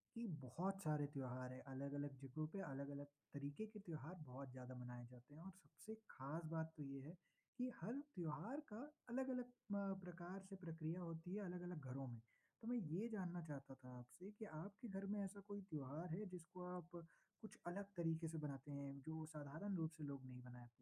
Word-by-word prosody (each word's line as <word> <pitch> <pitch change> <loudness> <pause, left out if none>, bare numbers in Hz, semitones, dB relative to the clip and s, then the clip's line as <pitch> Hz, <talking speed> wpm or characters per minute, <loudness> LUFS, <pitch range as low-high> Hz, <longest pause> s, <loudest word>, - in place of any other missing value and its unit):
कि 230 0 +2 0.2
बहुत 180 +10 +3
सारे 150 -3 +6
त्योहार 130 -1 +1
हैं, 130 - -3
अलग-अलग 140 +1 +1
जगहों 155 +4 +2
पे, 195 +5 -1
अलग-अलग 140 -3 0 0.3
तरीके 145 +8 +1
के 215 0 -5
त्योहार 165 -2 -1
बहुत 130 +1 -3
ज़्यादा 130 0 -3
मनाए 125 -1 -2
जाते 125 +3 -10
हैं। 160 - -6
और 190 +2 -3
सबसे 195 +3 -7 0.2
ख़ास 140 +6 +1
बात 160 0 +3
तो 150 - 0
ये 135 0 -1
है 150 +5 -4 0.4
कि 250 +1 +5
हर 210 +8 +3 0.2
त्योहार 175 - +2
का 215 - 0 0.3
अलग-अलग 255 0 +4
अ, 200 -5 +2
प्रकार 180 +2 -2
से 195 - -2
प्रक्रिया 165 -2 +1
होती 165 +2 0
है, 210 - +2
अलग-अलग 180 -2 0
घरों 135 +1 +1
में। 120 -2 -2 0.4
तो 225 - -3
मैं 245 +1 +6
ये 185 +2 +3
जानना 180 -4 +2
चाहता 140 -3 -2
था 125 -1 -6
आपसे 175 +11 -6
कि 220 - 0
आपके 200 +7 -3
घर 195 -1 +1
में 205 +1 +4
ऐसा 200 +1 -2
कोई 205 0 0
त्योहार 155 +3 +1
है, 210 +4 +1
जिसको 180 0 -3
आप 175 -1 -4 0.5
कुछ 215 - -5
अलग 190 +4 +3
तरीके 165 -1 +5
से 160 0 +1
बनाते 145 -1 0
हैं? 140 -1 0
जो 160 +2 0
साधारण 155 +6 0
रूप 160 -1 +4
से 155 - -2
लोग 140 -2 0
नहीं 125 -1 -4
मनाते? 125 -1 -6
160 Hz, 195 wpm, -50 LUFS, 140-190 Hz, 0.5 s, सारे